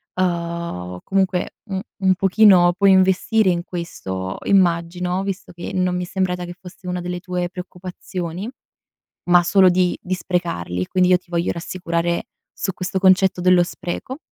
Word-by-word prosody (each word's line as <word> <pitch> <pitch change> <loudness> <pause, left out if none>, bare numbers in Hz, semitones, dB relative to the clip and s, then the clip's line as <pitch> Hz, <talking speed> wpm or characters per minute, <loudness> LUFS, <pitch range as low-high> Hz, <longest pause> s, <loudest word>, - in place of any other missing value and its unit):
uhm 170 - -2
comunque 190 -2 0
un 190 -1 -2 0.2
un 190 0 +4
pochino 190 -2 +5
puoi 200 0 +5
investire 190 +3 +3
in 175 -1 0
questo 95 - -5
immagino, 180 0 +1
visto 195 -1 -5
che 175 0 -7
non 185 -1 0
mi 180 - -2
è - - -6
sembrata 180 -1 -2
che 175 - -7
fosse 180 0 -12
una 180 0 -2
delle 180 0 -4
tue 180 0 -3
preoccupazioni, 180 +1 -6 0.8
ma 175 0 +6
solo 190 +1 +5
di 180 0 +1
di 185 - -3
sprecarli. 90 - -2
Quindi, 180 -1 +2
io 180 - +6
ti 180 - -29
voglio 170 0 0
rassicurare 170 0 -2 0.3
su 190 - -3
questo 185 +1 -3
concetto 190 -1 +4
dello 180 0 +5
spreco 175 +9 -6
180 Hz, 155 wpm, -21 LUFS, 175-185 Hz, 0.8 s, ma